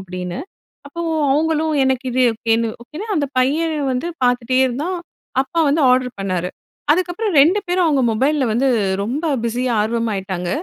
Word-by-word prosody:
அப்படின்னு, 180 -1 -6 0.5
அப்போ 340 +4 -6 0.3
அவுங்களும் 315 +1 +1
எனக்கு 265 0 0
இது 255 +1 +2
ஓகேன்னு 230 0 0
ஓகேன்னா, 310 - -8
அந்த 285 -2 0
பையன் 310 +5 +1 0.2
வந்து 255 +7 -2 0.2
பாத்துட்டே 245 +1 +1
இருந்தான். 300 +9 -2 0.4
அப்பா 335 +4 -3
வந்து 300 +2 +2
ஆர்டர் 250 -1 +1
பண்ணாரு. 185 -2 -2 0.4
அதுக்கப்புறம் 365 +4 0
2 360 +8 +4
பேரும், 355 0 +2
அவுங்க 280 -4 +2
மொபைல்ல 275 +5 +1
வந்து 265 +4 +2 0.4
ரொம்ப 275 +10 -3 0.2
பிஸியா 245 +1 -1
ஆர்வமா 230 +1 -1
ஆய்ட்டாங்க. 185 -2 -4
260 Hz, 145 wpm, -19 LUFS, 230-315 Hz, 0.5 s, 2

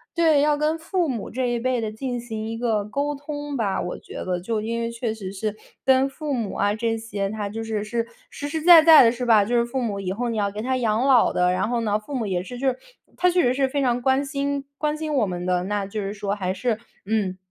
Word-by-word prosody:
对， 325 -4 +4
要 295 +1 +3
跟 305 +2 +1
父 340 0 -1
母 235 -6 -4
这 255 +1 -1
一 240 -1 0
辈 255 0 0
的 220 -1 -3
进 245 +2 -4
行 220 -2 -5
一 225 0 -4
个 225 -3 0
沟 280 +7 -2
通 290 0 -5
吧。 205 -5 0
我 180 - -5
觉 - - -13
得 180 -1 -2
就 215 +4 -2
因 230 +2 -2
为 230 - -1
确 235 -1 -3
实 200 -4 -7
是 210 +1 -3 0.3
跟 265 0 +4
父 290 +1 -4
母 230 -6 -2
啊 205 +1 +1
这 225 +1 -1
些， 205 -3 -3
他 210 -1 -4
就 225 +2 -5
是， 215 -2 -2
是 230 +2 -2 0.2
实 290 - -6
实 315 +2 -3
在 340 -1 +10
在 315 -2 +9
的， 230 - +5
是 250 +1 -4
吧？ 220 -3 +5
就 235 +4 -1
是 235 - +3
父 255 +2 -3
母 210 -5 -2
以 190 -1 -3
后 240 +4 -2
你 230 - -2
要 200 -1 +1
给 205 +2 -6
他 260 +3 0
养 230 0 +1
老 260 -4 +5
的。 180 0 +2
然 185 +2 0
后 240 0 0
呢， 210 -2 0
父 245 +7 -7
母 240 -4 -1
也 185 -3 -1
是 245 +6 -8
就 265 +2 +1
是 255 - -3 0.4
他 360 - +4
确 355 0 +3
实 245 -1 +3
是 270 0 +1
非 280 +2 -1
常 245 -2 +1
关 265 +2 +2
心 280 0 -2
关 300 0 0
心 310 -1 -4
我 255 -6 +3
们 180 -2 -4
的， 180 -1 +1
那 205 0 -1
就 200 +2 -5
是 200 0 -3
说 200 -1 -3
还 185 -3 -2
是 225 +3 -1 0.3
嗯， 200 -3 -1
235 Hz, 290 characters per minute, -24 LUFS, 210-270 Hz, 0.4 s, 在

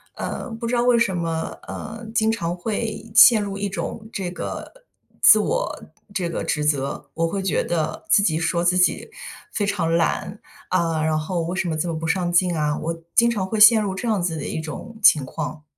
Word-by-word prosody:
呃， - - -5
不 225 +1 -5
知 245 - 0
道 240 - +2
为 245 -1 +4
什 200 -5 +1
么， 165 -1 -3
呃， 225 +2 -7
经 220 -1 +2
常 175 -6 -2
会 220 +4 -4
陷 230 -1 +8
入 200 -1 -4
一 205 - -2
种 215 +2 -5
这 190 -3 -3
个 180 - -6 0.5
自 - - +8
我 - - -2 0.3
这 180 -3 -2
个 170 - -3
指 150 - -1
责。 140 -2 -1
我 165 0 +1
会 195 +4 -3
觉 190 - 0
得 165 +3 -3
自 205 - +5
己 160 -5 +1
说 170 +1 0
自 180 +1 +2
己 180 - +1 0.4
非 205 - 0
常 185 -5 -1
懒， 190 +4 -1 0.3
啊， 165 -3 0
然 155 0 +1
后 170 +3 -2
为 175 +2 -3
什 190 -1 -1
么 160 - -1
这 165 +3 -1
么 165 - -2
不 165 - -5
上 175 +1 0
进 175 0 +2
啊， 150 -1 0
我 165 0 -4
经 235 0 +5
常 195 -4 -2
会 220 - -3
陷 215 +1 +8
入 195 -2 -2
这 240 - -5
样 210 -5 +1
子 170 -2 -1
的 145 - -5
一 - - -3
种 220 +8 -8
情 150 -8 +5
况。 150 +2 -6
180 Hz, 230 characters per minute, -22 LUFS, 165-215 Hz, 0.5 s, 陷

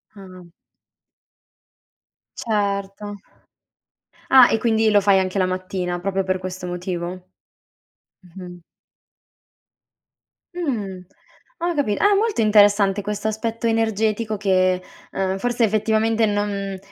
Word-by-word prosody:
Ah. 185 -3 -13 1.9
Certo. 205 -1 -3 1.1
Ah, 260 -2 +8
e 225 - +2
quindi 220 -1 +2
lo 205 - +5
fai 195 -1 +3
anche 185 +1 -2
la 185 - +2
mattina, 185 -1 -3
proprio 195 0 -1
per 185 0 0
questo 185 0 -7
motivo? 175 -1 -4
Mh-mh. 185 0 -9 1.0
Mh-mh. 175 0 -11 1.9
Mh, 220 - -3 0.6
ho 345 0 -1
capito. 245 -9 0
Ah, 410 0 +4
molto 425 - 0
interessante 205 -2 +4
questo 210 +1 -4
aspetto 225 +2 -2
energetico 220 -1 0
che, 185 -2 +1 0.3
uhm, 190 0 -2
forse 240 +2 -1
effettivamente 220 +1 +1
non 205 -2 -2
205 Hz, 105 wpm, -21 LUFS, 185-220 Hz, 1.9 s, Ah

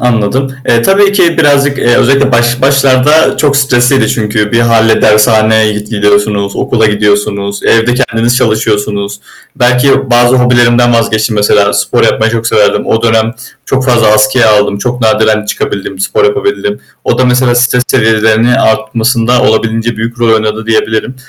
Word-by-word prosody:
Anladım. 125 +3 -1 0.2
Eee, 115 0 +2
tabii 200 +4 +2
ki 175 -4 +1
birazcık, 145 -2 +1
eee, 120 -1 +1
özellikle 135 +1 +1
baş 120 +1 0
başlarda 135 +3 +2
çok 145 -2 0
stresliydi. 135 -1 +1
Çünkü 105 -2 -2
bir 115 - +2
hâle 115 -1 +1
dershaneye 110 0 +2
git 105 0 -7
gidiyorsunuz, 105 -1 -1
okula 110 -2 0
gidiyorsunuz, 105 -1 -2
evde 115 +1 +1
kendiniz 120 -1 -1
çalışıyorsunuz. 105 -3 -2 0.4
Belki 130 +1 +1
bazı 120 +1 +3
hobilerimden 120 -1 +2
vazgeçtim 110 -1 -1
mesela. 105 0 +1
Spor - - -1
yapmayı 115 +1 0
çok 115 0 -3
severdim. 105 -2 0
O 110 - -1
dönem 115 0 0 0.3
çok 135 0 -1
fazla 120 -4 +1
askıya 110 +2 +2
aldım. 105 -1 0
Çok 125 +4 -4
nadiren 110 -1 +1
çıkabildim, 100 -2 -5
spor 95 - -1
yapabildim. 405 - -2 0.2
O 120 - -1
da 130 - +2
mesela 125 0 +1
stres 125 0 +1
seviyelerinin 110 0 +1
artmasında 115 0 0
olabildiğince 115 +1 -1
büyük 115 +2 -5
rol 115 -1 +2
oynadı 110 0 -3
diyebilirim 110 +3 -2
115 Hz, 150 wpm, -9 LUFS, 110-125 Hz, 0.4 s, bazı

